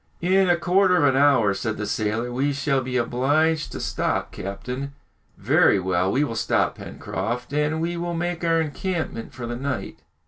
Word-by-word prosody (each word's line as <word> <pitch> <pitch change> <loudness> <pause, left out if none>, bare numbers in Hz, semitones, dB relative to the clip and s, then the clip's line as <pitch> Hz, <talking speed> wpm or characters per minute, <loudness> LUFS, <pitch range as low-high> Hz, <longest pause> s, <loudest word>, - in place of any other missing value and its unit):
"In 190 +1 +3
a 175 - +4
quarter 180 +1 +3
of 165 - +3
an 135 -2 +4
hour," 125 -9 +4
said 110 +3 -3
the 105 - -3
sailor, 110 +3 -1
"we 140 +3 0
shall 140 -1 0
be 130 0 -2
obliged 145 +6 +1
to - - -5
stop, - - -1
captain." 125 +8 -6 0.4
"Very 100 - +4
well, 95 0 0
we 140 - +2
will 140 - -2
stop, 110 - +1
Pencroft, 125 +3 -5
and 150 +2 0
we 170 +2 -2
will 170 0 -3
make 175 0 -3
our 165 -1 +3
encampment 160 -4 -3
for 125 -3 -7
the 120 0 -4
night." 135 +1 -4
140 Hz, 180 wpm, -23 LUFS, 120-165 Hz, 0.4 s, a